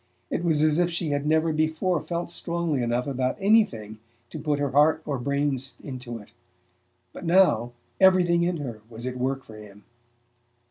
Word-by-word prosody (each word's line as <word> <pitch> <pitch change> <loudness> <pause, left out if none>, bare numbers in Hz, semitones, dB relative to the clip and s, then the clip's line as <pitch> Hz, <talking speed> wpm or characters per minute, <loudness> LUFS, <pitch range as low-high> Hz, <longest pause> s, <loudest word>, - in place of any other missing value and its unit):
It - - -1
was 155 -3 +2
as 155 +1 +3
if 175 0 +2
she 170 -2 -2
had 145 0 -1
never 160 +1 +2
before 160 +2 0
felt 170 0 -4
strongly 170 -5 -2
enough 120 +1 0
about 130 -2 -1
anything 155 - +2 0.3
to 155 - -6
put 150 0 0
her 145 -2 -1
heart 150 +3 +4
or 140 -3 -2
her - - -7
brains 140 -1 -1
into 125 -3 -6
it; 105 -1 -14 0.8
but - - -9
now 165 -10 +3 0.3
everything 180 -2 +5
in 175 0 0
her 120 -8 -6
was 115 +1 -8
at 130 0 -3
work 135 +1 -2
for 110 - -13
him. 105 -1 -13
145 Hz, 180 wpm, -25 LUFS, 125-170 Hz, 0.8 s, everything